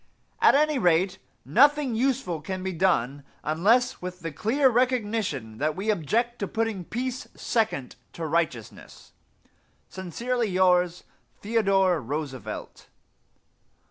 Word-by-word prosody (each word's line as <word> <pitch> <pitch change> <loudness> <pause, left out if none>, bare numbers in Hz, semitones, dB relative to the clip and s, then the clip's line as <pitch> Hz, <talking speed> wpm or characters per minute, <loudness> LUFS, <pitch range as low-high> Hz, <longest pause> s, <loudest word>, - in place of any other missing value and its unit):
At 440 -7 +6
any 300 -1 +3
rate 180 0 +2 0.3
nothing 285 +1 +4
useful 235 - 0
can 185 +3 -5
be 190 0 -3
done 145 -6 +1 0.2
unless 225 - +2
with 180 0 -7
the 165 -1 -4
clear 245 - +2
recognition 220 - 0
that 155 +1 0
we 205 +3 0
object 230 - -1
to 200 - -2
putting 225 -5 -2
peace 255 +4 -4
second 210 - -1 0.2
to 165 - -5
righteousness. 155 -8 -3 0.8
Sincerely 235 +6 -2
yours, 180 -1 +2 0.4
THEODORE 195 -6 +2
ROOSEVELT. 130 -5 -6
190 Hz, 110 wpm, -26 LUFS, 165-235 Hz, 0.8 s, At